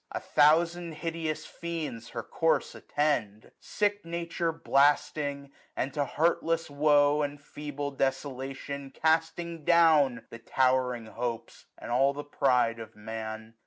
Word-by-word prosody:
1035 - - -1
A - - -11 0.2
thousand 170 0 -3
hideous 160 -1 -3
fiends 155 -9 -5
her - - -5
course 160 -3 0
attend; 120 -9 -1
Sick 205 -1 -1
Nature 170 0 -2
blasting, 145 -2 +1 0.2
and 135 +1 -2
to 145 -2 0
heartless 165 +1 0
woe. 145 0 +4
And 145 0 -3
feeble 145 0 -6
desolation, 135 0 -3
casting 160 +2 0
down 150 -8 +4
The 115 - -9
towering 130 -1 +1
hopes 115 +1 -5
and - - -8
all 135 +3 +3
the 145 +1 -6
pride 125 -5 +1
of 110 0 -9
Man. 110 +1 -7
145 Hz, 125 wpm, -29 LUFS, 130-160 Hz, 0.2 s, woe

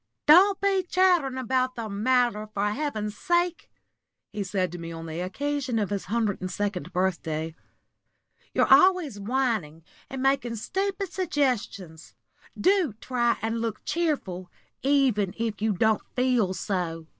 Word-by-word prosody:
"Don't 380 +6 +7
be 395 -1 +2
chattering 360 -7 +2
about 255 0 0
the 230 -2 -4
matter, 215 +1 +1
for 210 -1 -1
heaven's 215 -5 -3
sake!" 345 - 0 0.6
he 210 - -3
said 185 -2 -1
to 175 - -7
me 165 0 -7
on 165 0 -7
the 160 +1 -5
occasion 260 +6 -2
of 205 -2 -1
his 200 -1 -2
hundred 215 -1 -1
and 185 - -3
second 185 -3 -3
birthday. 165 -4 -1 1.0
"You're - - +4
always 360 - +4
whining 215 - -1 0.3
and 265 -2 -5
making 270 -4 +1
stupid 385 - -3
suggestions. 245 - -2 0.4
Do 370 - +3
try 240 -2 0
and 225 +1 -1
look 225 -2 -4
cheerful, 270 - -2 0.3
even 255 -8 +2
if 225 -3 -3
you 220 0 +2
don't 220 +3 +2
feel 245 -7 +1
so. 170 -5 -3
230 Hz, 140 wpm, -26 LUFS, 190-285 Hz, 1.0 s, Don't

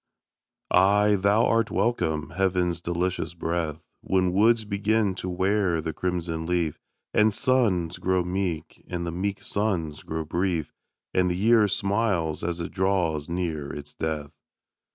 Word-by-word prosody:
Ay, 105 +3 +5
thou 100 +3 +3
art 115 0 +2
welcome, 80 -10 0
heaven's 90 -2 0
delicious 85 0 -2
breath, 80 -2 -2 0.2
When 90 -1 +1
woods 110 +3 +4
begin 105 0 +1
to 95 0 -5
wear 95 -1 +1
the 80 0 -3
crimson 85 -1 -2
leaf, 85 -3 0 0.3
And 110 +1 +4
suns 105 - +1
grow 95 -1 +1
meek, 90 -3 -3
and 85 -1 -3
the 85 - -3
meek 95 +3 -3
suns 90 -8 -1
grow 80 0 -4
brief, 85 -1 -1 0.4
And 90 -1 +3
the 90 - -1
year 110 +1 +5
smiles 100 -5 0
as 85 0 -2
it 85 - -4
draws 90 -5 0
near 85 -5 -2
its 75 0 -8
death. 75 -2 -3
90 Hz, 140 wpm, -26 LUFS, 85-100 Hz, 0.4 s, Ay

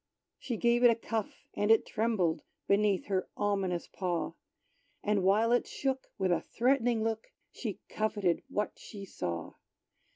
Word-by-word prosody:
She 240 -4 -3
gave 235 +2 +3
it 245 - +9
a 230 - +4
cuff, 225 -2 -4
and 205 - 0
it 225 0 +6
trembled 195 -8 +1 0.3
Beneath 200 -1 +3
her 190 -2 -1
ominous 195 -4 0
paw; 180 -3 -2 0.7
And 210 -1 +2
while 210 +5 +4
it 245 - +3
shook, 265 -1 -2
with 190 -2 +1
a 175 - +2
threatening 240 -2 +2
look, 225 0 -2 0.2
She - - -5
coveted 205 -5 0
what 210 - -1
she 200 -2 -9
saw. 85 - -4
210 Hz, 150 wpm, -31 LUFS, 190-230 Hz, 0.7 s, it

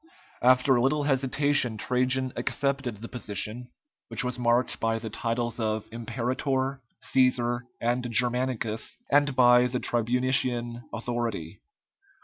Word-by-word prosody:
After 130 +2 +5
a 120 - +2
little 145 +4 +1
hesitation 135 -3 +1
Trajan 130 +2 +1
accepted 135 -5 -1
the - - -5
position, 115 +1 -3 0.4
which - - -1
was 125 0 -3
marked 120 +1 +1
by 115 0 0
the 110 -1 -6
titles 120 +1 -2
of 110 -1 -2
Imperator, 130 +4 -2 0.2
Cæsar, 125 -2 +2 0.2
and 120 +1 -1
Germanicus, 120 -1 0
and 145 -1 +3
by 125 0 +6
the 125 0 -2
tribunician 120 0 0
authority. 115 -8 -4
125 Hz, 120 wpm, -27 LUFS, 115-130 Hz, 0.4 s, by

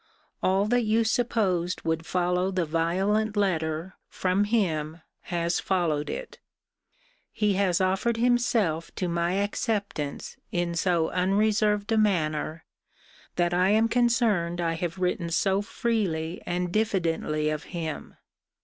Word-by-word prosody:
All 190 +2 +2
that 245 +3 +2
you 225 0 +2
supposed 210 -7 0
would 160 0 -2
follow 180 +1 +1
the 185 -3 0
violent 190 +7 0
letter, 165 -2 0 0.2
from 190 +2 +1
him, 165 -7 -1 0.3
has 170 -1 0
followed 165 -6 0
it. - - -6 0.9
He 210 -1 +1
has 190 -3 +2
offered 190 +5 +1
himself 230 -9 +1
to 185 - -2
my 170 +1 0
acceptance 200 - -2
in 175 -1 -1
so 170 -1 +1
unreserved 210 +3 +1
a 220 - +3
manner, 160 -6 0 0.7
that 175 0 +1
I 180 +2 +3
am 220 +2 +4
concerned 230 -8 +1
I 165 -1 0
have 170 +2 -3
written 180 -1 -1
so 195 +3 +1
freely 195 -7 -2
and 180 0 -1
diffidently 165 -7 0
of 155 0 -4
him. 160 -4 -5
185 Hz, 125 wpm, -26 LUFS, 170-210 Hz, 0.9 s, am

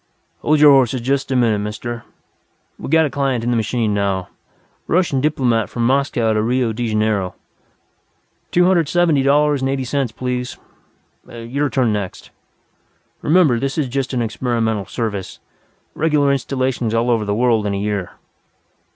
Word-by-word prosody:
"Hold 155 0 +2
your 150 -1 +8
horses 130 -2 +3
just 135 +3 -1
a - - +1
minute, 115 -4 +2
Mister. 110 +3 -5 0.7
We - - -6
got 160 +1 +4
a - - -1
client 135 -4 -1
in 120 - 0
the - - +1
machine 110 -1 0
now. 100 -2 -1 0.6
Russian 165 -7 +1
diplomat 125 -7 +1
from 120 -1 -2
Moscow 125 -4 +1
to 110 - +1
Rio 120 0 0
de 120 +2 -3
Janeiro.... 105 -4 0 1.1
Two 175 0 +3
hundred 175 -5 +2
seventy 170 -5 +2
dollars 145 +1 +2
and 135 - 0
eighty 135 -1 -1
cents, 130 -1 -1
please.... 125 +1 -4 0.7
Your 125 +5 -3
turn 125 -6 +1
next. 100 -3 -5 0.9
Remember 150 -7 +3
this 135 +3 -3
is 150 -4 0
just 135 +1 -2
an 125 -3 0
experimental 115 -3 -1
service. 105 -5 -4 0.6
Regular 150 -3 +2
installations 130 -3 -1
all 120 +2 +1
over 115 -2 +1
the 100 0 -1
world 115 -2 +2
in 100 - -1
a - - -2
year.... 100 -2 -3
125 Hz, 160 wpm, -19 LUFS, 110-140 Hz, 1.1 s, your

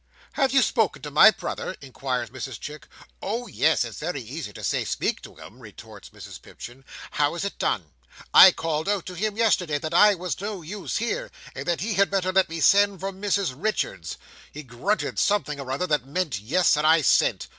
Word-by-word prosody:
"Have 270 -3 +1
you 270 -1 +4
spoken 215 - 0
to 150 - -6
my 150 +9 +8
brother?" 190 -1 -5
inquires 130 -3 -4
Mrs 130 -1 -7
Chick 150 +1 -9 0.3
"Oh, 230 +5 -3
yes, 160 - +1
it's 115 -3 -9
very 175 -5 -3
easy 130 0 -7
to - - -11
say - - 0
speak - - -2
to - - -13
him," - - -14
retorts - - -13
Mrs - - -12
Pipchin. 125 +3 -12 0.3
"How 145 +2 0
is 175 - -3
it 200 - -6
done? 80 -7 -1 0.4
I - - +10
called 160 +2 -3
out 205 -4 -1
to 185 - -7
him 210 +3 -3
yesterday, 185 -9 +1
that 155 +2 -5
I 210 +3 +6
was 180 0 -5
no 200 -3 -5
use 195 +5 -5
here, - - -3 0.2
and - - -7
that 175 -1 0
he 215 +3 -2
had 200 0 +2
better 185 -1 -1
let 190 -2 +3
me 165 0 -5
send 200 +2 +4
for 195 +1 -4
Mrs 195 -4 -1
Richards. 125 - -3 0.3
He 150 - -9
grunted 135 - -2
something 200 -8 0
or 135 -2 -6
other 140 +7 -1
that 150 -6 -1
meant 145 - -2
yes, 155 - +2
and 150 +1 +1
I 160 0 +5
sent. - - +2
170 Hz, 205 wpm, -24 LUFS, 140-200 Hz, 0.4 s, I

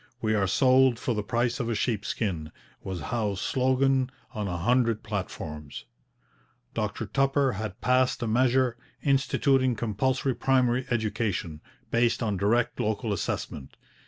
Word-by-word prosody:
'We 110 -1 0
are 100 -2 +2
sold 130 +4 +4
for 125 +1 -1
the 105 - -1
price 120 +4 -1
of 120 -3 -2
a 115 - 0
sheep 110 -1 -1
skin,' 85 -10 -2 0.3
was 95 -2 -5
Howe's 105 -5 -1
slogan 130 +2 +2 0.2
on 105 -4 -3
a 90 -2 -2
hundred 115 +3 +1
platforms. 75 - -5 0.9
Dr - - -2
Tupper 135 0 +2
had 105 -1 -5
passed 130 0 +2
a - - -1
measure, 125 +1 +2 0.3
instituting 135 -2 +2
compulsory 125 +5 0
primary 130 -1 +1
education, 105 -8 -2 0.3
based 115 +1 +2
on 105 -3 0
direct 115 +5 +1
local 110 0 -1
assessment. 70 -6 -4
115 Hz, 135 wpm, -27 LUFS, 105-130 Hz, 0.9 s, sold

